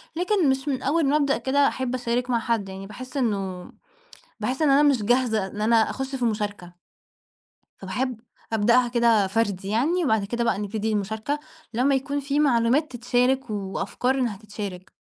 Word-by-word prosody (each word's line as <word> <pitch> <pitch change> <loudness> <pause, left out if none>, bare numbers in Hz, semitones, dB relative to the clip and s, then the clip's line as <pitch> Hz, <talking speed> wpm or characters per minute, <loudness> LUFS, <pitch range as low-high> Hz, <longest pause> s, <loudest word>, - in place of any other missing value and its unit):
لكن 360 -3 +2
مش 265 +2 -1
من 265 -3 -1
أول 300 +3 +1
ما 280 - +2
أبدأ 280 -2 +1
كده، 280 +1 +2
أحِب 255 -1 -2
أشارك 245 0 -1
مع 235 - +2
حد. 225 -4 -1
يعني 195 +1 -8
بأحِس 255 +6 -8
إنه 195 -7 -2 0.7
بأحِس 260 +5 -2
إن 305 - +4
أنا 275 +2 +5
مش 275 -7 +3
جاهزة، 225 -3 +2
إن 205 +2 -7
أنا 225 0 +3
أخُش 265 +1 -4
في 250 -2 -1
مُشاركة. 205 -5 -3 1.0
فباحب 235 +5 -3 0.3
أبدأها 235 +3 +3
كده 235 -4 +3
فردي 195 -2 -1
يعني، 310 - +1
وبعد 220 -6 +2
كده 235 +3 -2
بقى 230 - +1
نبتدي 215 +1 -2
المشاركة، 220 +7 -2 0.4
لمّا 265 +4 +3
يكون 280 +2 -1
في 280 +1 0
معلومات 270 +2 +2
تتشارك 245 +1 +1
وأفكار 200 +5 -2
إنها 245 -6 -1
تتشارك. 205 -3 -8
240 Hz, 165 wpm, -24 LUFS, 210-265 Hz, 1.0 s, أنا